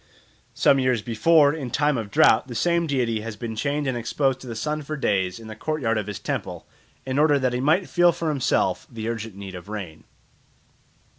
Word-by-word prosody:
Some 135 - +4
years 130 -4 +1
before, 145 +5 +4
in 145 -6 -5
time 145 +4 +1
of 110 -4 -4
drought, 110 +4 +4
the 120 - -7
same 170 +4 +1
deity 120 -6 0
had 110 -1 -7
been 115 0 -5
chained 145 +5 -1
and 130 -2 -1
exposed 130 +3 0
to 130 - -11
the 115 - -5
sun 150 +7 -2
for 150 +1 -5
days 95 -7 0
in 115 - -12
the 110 - -8
courtyard 120 -4 -1
of 105 - -5
his 105 -2 -5
temple - - -4 0.4
in 130 +1 -1
order 150 -1 +4
that 130 -2 0
he 125 - -1
might 160 +8 +2
feel 175 0 +4
for 170 -1 -3
himself 145 +2 0
the 110 -2 -5
urgent 115 -3 -4
need 100 -1 -8
of 90 +1 -10
rain. 95 -7 -7
125 Hz, 210 wpm, -24 LUFS, 110-150 Hz, 0.4 s, Some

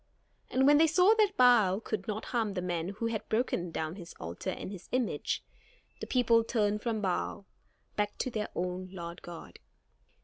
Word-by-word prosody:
And 265 +1 +2
when 290 +1 +7
they 325 - +6
saw 360 +6 +5
that 410 -2 +3
Baal 220 -7 +5
could 215 -3 -4
not 215 0 -3
harm 220 -4 0
the 180 - -1
man 175 -1 -2
who 210 +3 -4
had 230 -2 -3
broken 220 -6 0
down 160 +2 -4
his 175 -3 -10
altar 85 +2 -5
and - - -5
his 190 -4 -10
image, 250 -2 -1 0.6
the - - -5
people 235 -3 +4
turned 210 -2 0
from 225 -2 -1
Baal, 195 +1 -2 0.5
back 205 0 -1
to 255 - -2
their 215 -2 -2
own 180 +1 -3
Lord 170 -2 -7
God. 170 -1 -10
210 Hz, 180 wpm, -31 LUFS, 180-240 Hz, 0.6 s, when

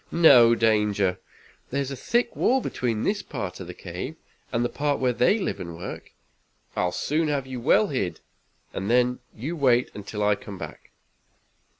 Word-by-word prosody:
"No 125 -9 +7
danger. 105 -4 +2 0.5
There 140 - -1
is 140 -1 -2
a - - -3
thick 235 - 0
wall 265 +2 +3
between 115 - -2
this 205 +1 0
part 100 - -5
of 95 - -7
the 90 - -8
cave, 90 - -6 0.4
and 120 0 +1
the - - +3
part 145 0 0
where 125 -1 +2
they 125 - +3
live 210 - -2
and 85 -2 -7
work. 90 - -7 0.7
I'll 90 - +1
soon 155 - 0
have 145 -3 -1
you 130 -1 -6
well 150 - +4
hid, 95 - -2 0.5
and 95 +2 -3
then 125 +1 +3 0.2
you 140 +10 -4
wait 125 -5 +3
until 105 +1 -5
I 105 0 +4
come 100 -1 -8
back." - - -9
120 Hz, 180 wpm, -25 LUFS, 100-140 Hz, 0.7 s, No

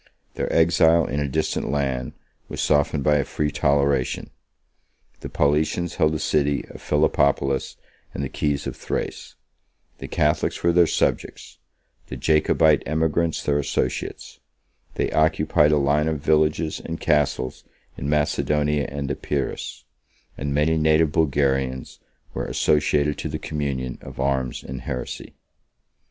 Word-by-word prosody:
Their - - -3
exile 80 0 +4
in 70 - -2
a 75 - -1
distant 80 +4 -1
land 65 -3 -2 0.4
was - - -6
softened 75 -1 +1
by 75 +1 +4
a 70 - +1
free 75 +2 -2
toleration: 70 -2 +1 0.9
the - - -7
Paulicians 80 +4 0
held 75 0 +3
the - - 0
city 70 -2 0
of - - -11
Philippopolis 70 -2 +1 0.3
and 70 - -4
the - - -1
keys 70 +1 -2
of - - -4
Thrace; - - -5 0.6
the - - -6
Catholics 75 +1 0
were 85 - +4
their 85 -1 +5
subjects; - - -2 0.5
the - - -6
Jacobite 75 -1 +3
emigrants 80 +2 0
their 70 0 +1
associates: 70 - -3 0.6
they - - -1
occupied 75 -1 +3
a 75 - +4
line 75 +2 +2
of 80 -2 -1
villages 75 +1 +1
and 80 0 -5
castles 75 -4 0 0.3
in 70 - -4
Macedonia 75 -1 +1
and 70 0 -4
Epirus; 70 -2 -4 0.5
and 70 +1 -4
many 75 +3 +2
native 80 0 +3
Bulgarians 70 -4 0 0.3
were - - -3
associated 75 -1 +1
to 80 - -3
the 75 - -3
communion 70 -5 -4
of - - -11
arms 65 -2 -1
and 65 -1 -7
heresy. 65 0 -6
75 Hz, 135 wpm, -23 LUFS, 70-80 Hz, 0.9 s, their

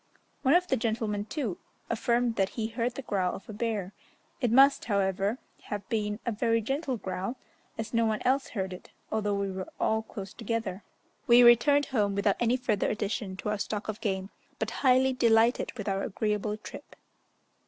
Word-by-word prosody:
One 270 +3 +4
of 360 +1 +4
the 265 - +1
gentlemen, 220 -3 -1
too, 225 - -3 0.3
affirmed 235 0 +1
that 195 -2 +1
he 225 - 0
heard 235 +1 -2
the 275 - -6
growl 185 -5 0
of 195 - -11
a 220 - -7
bear; 210 -3 -2 0.5
it 245 -4 +1
must, 275 +3 +6
however, 200 +1 0 0.3
have 205 -2 -5
been 210 -2 -1
a 235 - 0
very 230 +1 +1
gentle 270 +3 -2
growl, 190 +4 -4 0.4
as 220 +1 -5
no 230 0 +3
one 215 -1 0
else 270 +2 +2
heard 190 -4 -3
it, 180 - -11 0.2
although 210 -2 0
we 200 -1 -1
were 190 0 -5
all 220 0 +2
close 200 -2 -8
together. 225 -4 -3 0.5
We 245 0 +8
returned 240 +5 +6
home 205 -6 0
without 200 0 +2
any 240 +1 +2
further 225 -5 0
addition 205 -2 -3
to 210 - -3
our 210 -1 -1
stock 210 0 -3
of 215 +1 -4
game, 190 -2 -2 0.3
but - - -2
highly 260 0 +4
delighted 230 -1 +3
with 210 - -5
our 195 -1 0
agreeable 210 +1 -1
trip. 215 - -11
220 Hz, 185 wpm, -29 LUFS, 200-240 Hz, 0.5 s, We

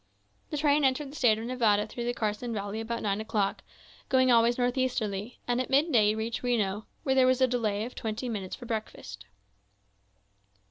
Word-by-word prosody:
The 300 - -3
train 290 0 +3
entered 270 +1 +1
the - - -12
State 230 -7 +3
of 225 - -5
Nevada 225 -4 +2
through 240 - -6
the 240 - 0
Carson 220 +2 -2
Valley 205 +2 -4
about 230 +1 -4
nine 205 0 0
o'clock, 210 -2 -1 0.5
going 260 -1 +4
always 235 0 +4
northeasterly; 245 -4 -1
and 245 +1 +1
at 255 - -5
midday 260 -7 +3
reached 225 +1 -3
Reno, 215 -4 -1 0.2
where 265 - +1
there 260 -1 +5
was 255 0 +3
a 260 - +5
delay 220 -4 -1
of 250 - -8
twenty 220 +3 -4
minutes 200 -5 -4
for 245 - -11
breakfast. 215 - -6
235 Hz, 180 wpm, -28 LUFS, 215-255 Hz, 0.5 s, there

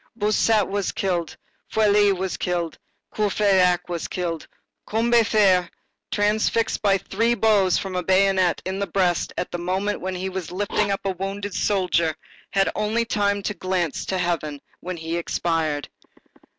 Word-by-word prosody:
Bossuet 215 0 +2
was 200 -1 -1
killed; 175 -4 -2 0.3
Feuilly 210 -1 +4
was 190 -1 -2
killed; 175 -2 -2 0.4
Courfeyrac 190 -4 +2
was 170 -2 -3
killed; 170 -3 -4 0.4
Combeferre, 215 -5 +3 0.4
transfixed 215 +2 +1
by 200 -2 +3
three 225 +5 0
blows 205 -4 +3
from 190 -2 -4
a 180 - 0
bayonet 190 -1 +2
in 190 +1 -3
the 200 - -1
breast 180 -1 +1
at - - -3
the 175 - -3
moment 190 +4 -1
when 185 0 -3
he 185 +1 -3
was 185 -3 -5
lifting 205 +2 0
up 195 - -1
a 195 - +1
wounded 195 +2 -4
soldier, 180 -6 +1 0.3
had 195 0 +2
only 220 +2 0
time 200 -2 0
to 210 - -1
cast - - -28
a - - -6
glance 180 -5 -1
to 190 - -1
heaven 165 -5 -2 0.2
when 180 0 -5
he 165 +1 -3
expired. 165 -3 -1
190 Hz, 155 wpm, -23 LUFS, 180-205 Hz, 0.4 s, Feuilly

